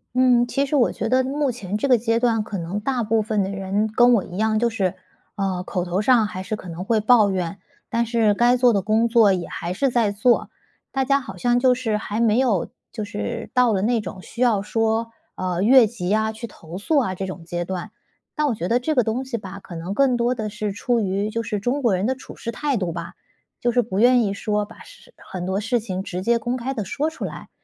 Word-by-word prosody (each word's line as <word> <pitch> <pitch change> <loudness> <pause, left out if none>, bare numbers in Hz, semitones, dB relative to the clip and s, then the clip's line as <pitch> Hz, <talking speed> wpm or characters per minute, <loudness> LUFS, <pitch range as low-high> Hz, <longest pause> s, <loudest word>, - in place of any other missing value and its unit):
嗯， 250 -1 +4
其 275 +3 0
实 280 - -1
我 255 -4 +3
觉 - - -3
得 255 +2 +3
目 280 +1 0
前 210 -4 -4
这 245 - -1
个 255 - +6
阶 230 0 +1
段 235 -2 +2
可 210 -1 -5
能 175 +4 -3
大 245 +2 -1
部 220 +1 +1
分 215 -2 0
的 190 - -3
人 195 +2 -1
跟 240 +2 +5
我 215 -6 +3
一 180 -1 -9
样， 215 +1 +1
就 235 +2 +2
是， 200 -6 -1 0.4
呃， 190 -3 -2
口 180 -1 -3
头 180 +2 -1
上 230 0 +4
还 185 -3 -5
是 215 +3 -3
可 200 - -11
能 170 +1 -6
会 220 +3 +1
抱 215 -1 +5
怨， 185 0 -3 0.3
但 235 0 +1
是 225 -2 +3
该 240 +4 +3
做 245 -1 +4
的 200 - +2
工 220 +4 +2
作 225 -3 +5
也 180 -2 -3
还 175 - -5
是 250 +8 0
在 230 -4 +2
做。 215 +4 +2 0.4
大 270 -1 0
家 275 +1 +2
好 265 - -9
像 245 -1 +2
就 250 0 +4
是 235 -4 -1
还 210 0 -4
没 230 0 +3
有， 230 -9 +1 0.2
就 215 -3 -4
是 225 +3 -5
到 250 -2 +4
了 195 -2 0
那 230 +1 +1
种 190 -1 -7
需 240 - -8
要 225 -6 +3
说， 225 +1 0 0.2
呃， 180 -1 -2
越 245 +4 +7
级 205 -4 -4
啊 220 +1 +2
去 225 +2 -7
投 170 -3 -10
诉 300 +9 +1
啊 235 -9 +1
这 190 +1 -4
种 180 -2 -8
阶 175 +1 -3
段。 185 +3 -5 0.4
但 300 -1 0
我 250 - 0
觉 175 -4 -3
得 235 +5 +2
这 310 +5 -1
个 250 - +4
东 225 +4 -1
西 255 -3 -3
吧， 195 -2 -8
可 180 - -11
能 170 +4 -4
更 260 +1 +3
多 240 +1 +1
的 220 -4 -4
是 210 0 -3
出 235 +4 0
于 200 0 -1
就 230 +1 -2
是 210 -1 -3
中 250 +7 -1
国 225 -6 +3
人 190 +4 0
的 260 - 0
处 260 - -12
世 230 - -5
态 280 +2 -1
度 180 -4 -2
吧？ 170 +1 -6 0.5
就 240 - +2
是 245 +1 +2
不 200 -3 -3
愿 245 +1 +5
意 200 -2 -1
说 210 +1 -1
把 215 - -15
事 - - -17
很 180 -2 -7
多 190 +1 -1
事 235 +3 0
情 190 -4 -4
直 185 -1 -5
接 235 +2 +2
公 240 +2 -2
开 255 +2 -3
地 220 -5 -3
说 295 - -1
出 320 - -6
来， - - -8
220 Hz, 275 characters per minute, -22 LUFS, 195-245 Hz, 0.5 s, 越